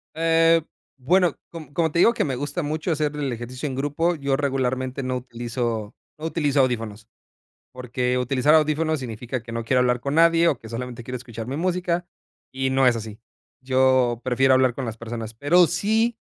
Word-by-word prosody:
Eh, 165 0 +4 0.4
bueno, 175 +7 +2 0.2
com 160 -3 -9
como 165 -2 +1
te 170 - 0
digo 230 - +6
que - - 0
me 135 -4 -2
gusta 145 +6 -3
mucho 155 +4 -2
hacer 150 -1 -1
el 145 -3 -2
ejercicio 125 +4 -5
en 135 - -4
grupo, 145 +6 0
yo 140 -3 -1
regularmente 130 -1 -1
no 130 0 -1
utilizo 120 -3 -4 0.2
no 155 - -6
utilizo 150 -4 0
audífonos. 115 -4 -2 0.7
Porque, 125 0 -2
utilizar 130 +4 +2
audífonos 155 0 +2
significa 120 0 -5
que 115 0 -9
no 115 0 -3
quiero 125 +2 +2
hablar 125 -1 +2
con 140 +3 -3
nadie, 165 +1 +5
o 135 - 0
que 110 - -12
solamente 120 +1 -6
quiero 125 +1 -5
escuchar 120 -2 -8
mi 135 - -4
música, 175 0 -1 0.5
y 130 0 -1
no 135 0 +3
es 120 -2 +4
así. 110 -1 -7 0.4
Yo 130 -2 +2
prefiero 130 +1 +3
hablar 130 -2 +3
con 135 - -4
las 115 0 -5
personas. 115 -1 -6
Pero 170 +9 +4
si 220 +6 +1
130 Hz, 190 wpm, -23 LUFS, 120-155 Hz, 0.7 s, digo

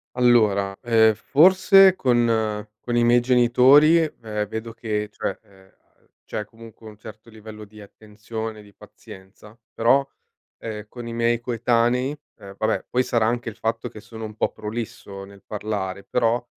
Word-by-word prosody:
Allora, 105 -6 +2
ehm, 110 -2 +4
forse 185 - +5
con 115 - 0 0.2
con 120 - -1
i 120 - +3
miei 120 +1 +4
genitori, 130 +6 +5
ehm, 110 -9 -3
vedo 110 +2 -6
che, 105 -2 -4
cioè, - - -4 0.9
c'è 105 - -5
comunque 115 0 -15
un 105 -1 -13
certo 110 +1 -13
livello 110 -1 -12
di 105 +1 -15
attenzione, 110 +1 -8
di 100 -1 -18
pazienza. 100 +4 -16 0.2
Però, 135 +4 +2 0.5
ehm, 110 -1 -7
con 120 +1 -10
i - - -6
miei 115 0 0
coetanei 120 +3 0 0.2
ehm, 100 0 -12
vabbè, 110 0 -1
poi 125 +1 +1
sarà 115 -3 0
anche 120 +1 -2
il 105 - -12
fatto 115 0 -3
che 110 - -12
sono 110 0 -11
un 105 -1 -9
po' - - 0
prolisso 105 -3 -7
nel 100 0 -17
parlare, 100 -2 -5
però 120 0 0
115 Hz, 150 wpm, -22 LUFS, 105-120 Hz, 0.9 s, forse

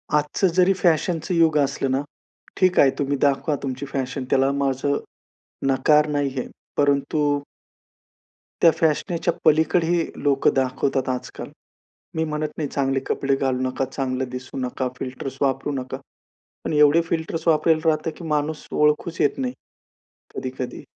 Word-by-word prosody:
आजचं 150 +6 +2
जरी 185 +1 +5
फॅशनचं 175 -1 +1
युग 160 -2 +4
असलं 140 -1 0
ना, 135 +1 +1 0.6
ठीक 185 -1 +3
आहे 135 - +7
तुम्ही 140 0 0
दाखवा 145 +1 +2
तुमची 135 +1 -4
फॅशन 135 -1 -3
त्याला 135 +1 +3
माझं 140 0 0 0.7
नकार 150 +3 +4
नाही 145 -2 0
आहे. - - -4 0.3
परंतु 145 +1 +2 1.2
त्या 165 - +7
फॅशनेच्या 165 +2 +1
पलीकडे 160 +2 +3
ही 170 -1 +2 0.2
लोकं 140 -1 +3
दाखवतात 130 0 0
आजकाल. 125 -1 -5 0.7
मी 160 - +1
म्हणत 155 -1 -2
नाही, 150 -3 -2
चांगले 135 -1 0
कपडे 135 0 +1
घालू 130 -2 -1
नका, 135 +1 -2
चांगलं 130 -1 -3
दिसू 130 +1 -7
नका, 130 0 -2
फिल्टर्स 130 +1 -6
वापरू 140 +1 0
नका. 130 -1 -4 0.7
पण - - -2
एवढे 150 +2 +5
फिल्टर्स 165 0 -2
वापरायला 160 0 +3
राहतं 155 +1 0
की 175 - -10
माणूस 150 0 -2
ओळखूच 150 +3 +1
येत - - +2
नाही, 255 -1 -2 0.8
कधी-कधी. - - -5
145 Hz, 140 wpm, -23 LUFS, 135-160 Hz, 1.2 s, आहे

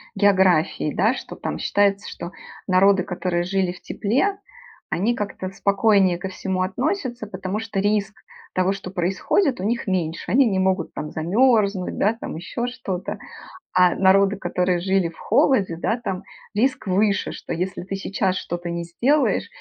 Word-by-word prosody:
географией, 190 -6 +3
да. 215 +6 +3
Что - - -8
там - - -4
считается, 200 0 +1
что 170 - -7 0.4
народы, 190 0 +4
которые 180 -1 -2
жили 185 0 0
в 180 - -12
тепле, 285 - 0 0.5
они 195 +8 +1
как-то 200 -3 -4
спокойнее 195 -2 +2
ко 190 - -4
всему 185 0 -3
относятся. 250 - -2
Потому 190 +1 -4
что 220 -3 -3
риск 205 0 +1 0.4
того, 185 +1 +2
что 195 -2 -7
происходит, 195 - +1
у - - -4
них 230 +1 -1
меньше, 170 -3 -2
они 270 +2 +5
не 195 -3 +1
могут 190 -2 0
там 150 - -5
замерзнуть, 200 +2 +2
да, 210 +3 +3
там - - -6
еще 185 +8 -4
что-то. 200 -7 -4 0.6
А 180 -1 +5
народы, 195 +1 +4
которые 180 -1 0
жили 190 -1 +1
в 165 - -16
холоде, 200 -11 +2
да, 225 +7 -1
там 185 -1 -3 0.3
риск 250 0 +1
выше, 200 +2 +1
что - - -6
если 180 +2 -3
ты 195 +2 -4
сейчас 195 -1 -1
что-то 175 0 -4
не 170 0 -3
сделаешь, 260 - +1
195 Hz, 160 wpm, -23 LUFS, 180-210 Hz, 0.6 s, они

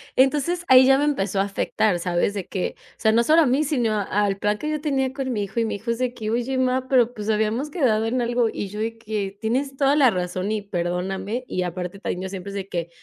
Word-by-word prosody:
entonces 300 +6 +2
ahí 260 0 +8
ya 270 +1 +5
me 295 - +2
empezó 195 -9 0
a - - +4
afectar, 200 0 0
¿sabes?, 175 +3 0
de 195 - -3
que 185 - -3
o - - -25
sea, 220 - +4
no 235 +1 +4
solo 315 +5 +5
a - - +4
mí, 270 +5 +2
sino 240 -8 0
al 200 0 0
plan 210 +1 0
que 305 - -3
yo 305 -1 -1
tenía 270 -3 0
con 265 -2 -3
mi 210 - -1
hijo, 200 +4 -4
y 230 - +2
mi - - -2
hijo 225 +4 -7
es 235 - 0
de 250 0 -1
que: 215 -3 -5
"Oye 245 +3 -1
má, 260 0 +1
pero 245 -3 +3
pues, 210 0 -6
habíamos 220 +7 0
quedado 225 -9 +1
en 245 +2 0
algo", 240 0 +1
y 200 - -4
yo 210 +2 -8
de 225 +1 -3
que: 210 -3 -4
"Tienes 265 +5 -1
toda 275 +1 +3
la 270 -6 +5
razón 185 +2 -2
y 215 -1 -1
perdóname", 190 +5 -3
y 185 - -2
aparte 180 +2 -5
también 180 -3 -3
yo 190 - -4
siempre 195 0 -6
es - - -9
de 195 -1 -5
que, 170 -1 -3
225 Hz, 265 wpm, -23 LUFS, 195-260 Hz, -, ahí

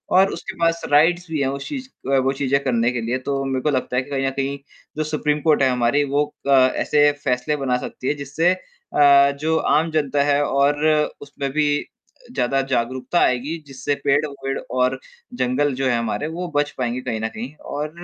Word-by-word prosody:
और 190 +1 +5
उसके - - -7
पास 165 0 +1
राइट्स 175 +4 +4
भी 155 - -1
हैं 135 - +1
उस 140 0 -5
चीज 265 -3 -6 0.2
अ, 135 - +4
वो 135 +1 +1
चीज़ें 140 0 +1
करने 120 -2 +1
के 120 -2 -3
लिए। 120 +3 -1
तो 135 +1 -2
मेरे 130 -1 -1
को 150 - +2
लगता 130 -2 -1
है - - +3
कि 145 - -15
कहीं 135 -1 -1
न - - +2
कहीं 135 +1 -2 0.4
जो 155 - +1
सुप्रीम 150 -1 -1
कोर्ट 155 -3 +3
है 130 - +4
हमारी 125 +4 +2
वो 145 +1 +3 0.2
अ, - - 0
ऐसे 140 +3 +4
फैसले 125 +3 0
बना 125 -2 +1
सकती 130 - -7
है - - +2
जिससे 145 +5 +1
अ, 140 -5 +3
जो 160 +2 +1 0.2
आम 160 +1 0
जनता 145 -2 +1
है 145 0 +2
और 145 +2 +1 0.4
उसमें 140 -1 -5
भी 150 0 +1 0.7
ज़्यादा 135 +1 +1
जागरूकता 130 +6 0
आएगी 135 +7 +1
जिससे 135 +1 -3
पेड़-वेड़ 140 -1 0 0.2
और 130 +1 +1 0.4
जंगल 130 +3 +1
जो 135 - +1
है 120 -2 +2
हमारे 115 +6 -2
वो 175 +2 -4
बच 145 0 +2
पाएँगे 125 0 -2
कहीं 110 -3 -3
न 110 - 0
कहीं। 120 +6 -7 0.2
और 150 +1 -2
140 Hz, 205 wpm, -21 LUFS, 130-150 Hz, 0.7 s, और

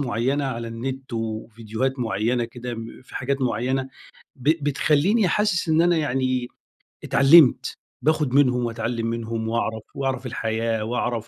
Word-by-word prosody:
مُعيّنة 135 +2 0
على 115 -3 -3
النت 130 +3 -6
وفيديوهات 115 +3 -3
مُعيّنة 115 +1 0
كده 120 +1 -6
م 115 +2 -9
في - - -10
حاجات 135 +1 -1
مُعيّنة 130 +2 0 0.5
ب 135 +3 -3 0.2
بتخلّيني 160 - +2
حاسس 205 -4 +1
إن 160 +1 +4
أنا 175 0 +3
يعني 130 -4 0 0.6
اتعلمت، 140 0 +5 0.3
باخد 150 -4 +1
منهم 125 -3 +3
وأتعلم 115 0 -2
منهم 115 -1 -3
وأعرف 110 -1 -2
وأعرف 135 -1 -2
الحياة 115 -2 -1
وأعرف 120 0 -2
125 Hz, 135 wpm, -23 LUFS, 115-135 Hz, 0.6 s, اتعلمت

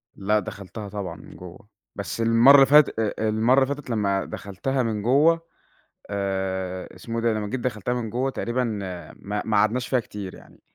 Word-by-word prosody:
لأ، 105 +2 +1
دخلتها 100 +1 -8
طبعًا 95 -4 -5
من - - -14
جوَّه، 90 +3 -12 0.3
بس 100 +3 -4
المرّة 115 +4 +7
اللي 135 -1 +8
فاتت 145 -2 +5
أ 110 -2 0
أ 110 - +1
المرّة 115 +5 +3
اللي 140 +2 -1
فاتت 145 -2 -12
لمّا 100 -4 0
دخلتها 125 +7 -3
من 110 -3 -2
جوّه 150 +9 +4 0.7
آآ، 95 -2 -3
اسمه 115 0 -6
إيه - - -4
ده؟ 115 - +3
لمّا 105 -1 -3
جيت 130 +5 -3
دخلتها 120 -1 -2
من 120 -3 -3
جوّه 125 +4 -1
تقريبًا 125 -1 -2
ما 100 -2 -5
ما 110 -2 +1
قعدناش 115 +5 +2
فيها 130 - +2
كتير 100 -4 -7
يعني، - - -18
110 Hz, 190 wpm, -24 LUFS, 100-125 Hz, 0.7 s, اللي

